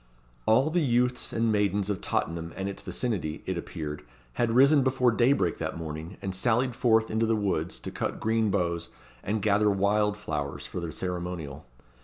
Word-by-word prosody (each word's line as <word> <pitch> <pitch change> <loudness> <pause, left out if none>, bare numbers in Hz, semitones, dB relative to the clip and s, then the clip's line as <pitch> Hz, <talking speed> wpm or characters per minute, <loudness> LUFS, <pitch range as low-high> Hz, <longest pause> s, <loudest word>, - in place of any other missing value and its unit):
All 130 +8 +4
the 175 +1 +2
youths 125 -2 +1
and 115 0 +1
maidens 100 -1 +1
of 100 -3 -2
Tottenham 85 +1 -2
and 95 0 -3
its 100 - -5
vicinity, 95 -11 -3
it 95 - -2
appeared, 80 -3 -5 0.3
had 120 - +1
risen 135 +5 +6
before 130 -2 +3
daybreak 125 +5 +2
that - - -3
morning, 80 +3 -6
and 95 -1 -2
sallied 120 +5 +1
forth 110 -2 +3
into 110 +1 +1
the 115 - +2
woods 95 -5 -1
to - - -7
cut - - -3
green 110 -1 +1
boughs, 85 -3 -1 0.3
and 105 0 -2
gather 105 0 +3
wild 105 +1 +2
flowers, 75 -8 -4
for - - -5
the 85 -2 -4
ceremonial. 90 -4 -5
105 Hz, 175 wpm, -28 LUFS, 85-115 Hz, 0.3 s, risen